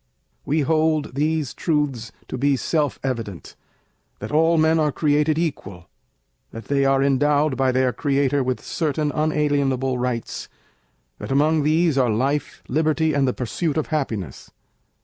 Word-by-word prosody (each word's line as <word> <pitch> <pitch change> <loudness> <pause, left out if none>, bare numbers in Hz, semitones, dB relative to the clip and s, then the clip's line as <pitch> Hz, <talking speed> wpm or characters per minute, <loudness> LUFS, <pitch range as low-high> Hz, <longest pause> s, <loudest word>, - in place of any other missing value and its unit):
We 155 +2 +1
hold 155 -1 +1
these 150 0 -1
truths 140 -9 -1 0.2
to - - -5
be 140 +1 +1
self 150 0 -1
evident, 115 -9 -5 0.6
that - - -7
all 165 +2 +3
men 160 +1 +3
are 150 -1 +2
created 150 +1 +1
equal, 100 - -4 0.6
that 115 - -9
they 140 -1 +1
are 135 0 +3
endowed 145 +1 +2
by 130 0 +2
their 130 -1 +1
Creator 140 -1 +1
with 130 0 -3
certain 150 -1 -1
unalienable 140 -4 0
Rights, 125 -2 -3 0.7
that - - -6
among 150 +3 +3
these 155 0 +2
are 125 -2 +3
Life, 135 +7 -1
Liberty, 155 +2 +1
and 140 -1 +2
the 125 - +1
pursuit 145 +6 -2
of 155 - -2
Happiness. 115 - -3
145 Hz, 145 wpm, -22 LUFS, 130-155 Hz, 0.7 s, all